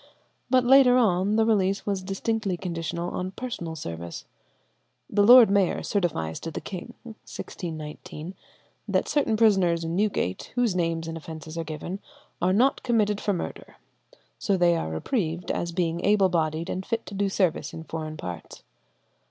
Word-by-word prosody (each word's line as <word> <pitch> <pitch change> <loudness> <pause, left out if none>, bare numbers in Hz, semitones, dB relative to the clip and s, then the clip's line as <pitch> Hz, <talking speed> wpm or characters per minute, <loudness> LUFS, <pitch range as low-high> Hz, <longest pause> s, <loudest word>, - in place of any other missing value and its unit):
But 255 0 +4
later 255 -1 +7
on 200 -3 +2
the 225 0 +4
release 195 -3 +1
was 200 -2 -1
distinctly 195 0 -2
conditional 170 -1 -3
on 185 0 -3
personal 185 -10 -5
service. 85 - -6 0.8
The 205 - +1
lord 235 0 +9
mayor 200 -3 +2
certifies 150 - -1
to 165 - -5
the - - -5
king 185 -3 -8
(1619) 165 -7 -8 0.5
that - - +1
certain 275 -7 +1
prisoners 190 -7 +3
in 165 +1 -2
Newgate, 195 - -1
whose 240 -6 +2
names 165 -2 -1
and 165 0 -4
offences 160 0 -8
are 165 - -2
given, 160 +5 -6 0.4
are 180 - +3
not 245 +8 +3
committed 210 -4 +1
for 205 - 0
murder; 175 - -6 0.6
so 200 -2 +1
they 175 -1 +4
are 120 - -2
reprieved, 170 - -2
as 170 - -2
being 170 0 -1
able 200 -2 +4
bodied 160 -1 0
and 185 - -3
fit 230 +2 -3
to - - -9
do 200 0 0
service 185 -4 0
in 160 - -8
foreign 155 -1 -5
parts. 90 - -8
180 Hz, 160 wpm, -26 LUFS, 165-210 Hz, 0.8 s, lord